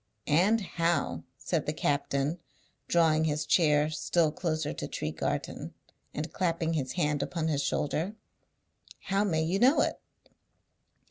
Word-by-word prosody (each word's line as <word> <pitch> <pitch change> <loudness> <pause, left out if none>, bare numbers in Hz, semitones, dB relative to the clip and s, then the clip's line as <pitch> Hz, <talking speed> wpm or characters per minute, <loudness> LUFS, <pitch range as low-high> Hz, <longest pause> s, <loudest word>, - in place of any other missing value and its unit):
"And 190 +9 +3
how," 165 - -1
said - - -2
the - - 0
captain, 140 +2 0 0.5
drawing 160 -2 +3
his 150 -1 -1
chair 150 -2 +3
still 160 0 +1
closer 155 -2 -2
to - - -5
Tregarthen, 75 +1 -3 0.4
and 155 +2 -5
clapping 165 -2 0
his 135 -5 -2
hand 150 -5 0
upon 160 +2 -2
his 145 -2 +1
shoulder, 155 +8 -1 1.0
"how 200 +1 +3
may 160 -6 +1
you 175 +5 0
know 260 +7 +5
it?" - - -1
160 Hz, 130 wpm, -29 LUFS, 150-175 Hz, 1.0 s, know